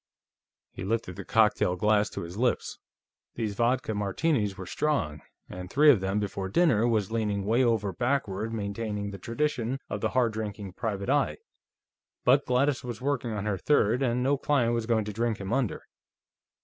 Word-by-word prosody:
He - - -7
lifted 100 -3 -2
the - - -7
cocktail 105 -5 +3
glass 105 +2 +2
to - - -6
his 85 +2 -8
lips. 120 +3 -1 0.6
These 110 -3 -2
vodka 120 +1 0
Martinis 105 +1 0
were 95 - -6
strong, 95 - -1 0.3
and 90 0 -8
three 145 +7 +6
of 120 - +3
them 95 +2 0
before 95 -2 -3
dinner 120 - +3
was 110 -4 0
leaning 105 -3 -1
way 115 +5 +3
over 110 -5 +1
backward 115 -2 -1
maintaining 105 -1 -3
the 100 - -8
tradition 130 +2 -2
of 105 - -3
the 110 - +1
hard 120 -2 +1
drinking 105 -3 -5
private 105 +2 -2
eye, 145 -1 +1 0.9
but 135 +3 +4
Gladys 130 +2 +1
was 120 -3 -5
working 130 -3 -1
on 105 -1 -3
her 100 -3 -1
third, 125 -2 +2
and 125 -1 +1
no 140 +1 +2
client 125 -6 +2
was 115 -1 -1
going 110 -3 +1
to 105 - -5
drink 115 0 -1
him 100 +2 -4
under. 130 -4 -1
110 Hz, 175 wpm, -28 LUFS, 100-125 Hz, 0.9 s, three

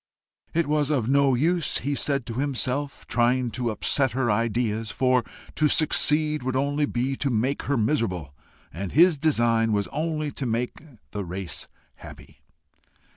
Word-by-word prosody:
It 170 0 +2
was 150 -1 +1
of 130 -7 0
no 140 0 +3
use, 165 +3 +1
he 145 +3 -2
said 140 -2 -1
to 115 - -6
himself, 140 +1 -2
trying 120 +1 +1
to 120 +2 -2
upset 130 +3 +1
her 130 -2 +1
ideas, 115 0 -1
for 125 0 +2 0.3
to 150 - +2
succeed 150 0 +3
would 130 +1 -2
only 145 +2 +1
be 130 +2 -1
to 140 - -1
make 125 +4 0
her 140 - +2
miserable, 105 - -1 0.4
and 90 +3 -5
his 165 0 +5
design 115 -7 +2
was 100 -1 +1
to 155 - -3
make 120 +2 -2 0.3
the 105 - -4
race 90 0 -5 0.3
happy. - - -13
130 Hz, 150 wpm, -25 LUFS, 115-145 Hz, 0.4 s, his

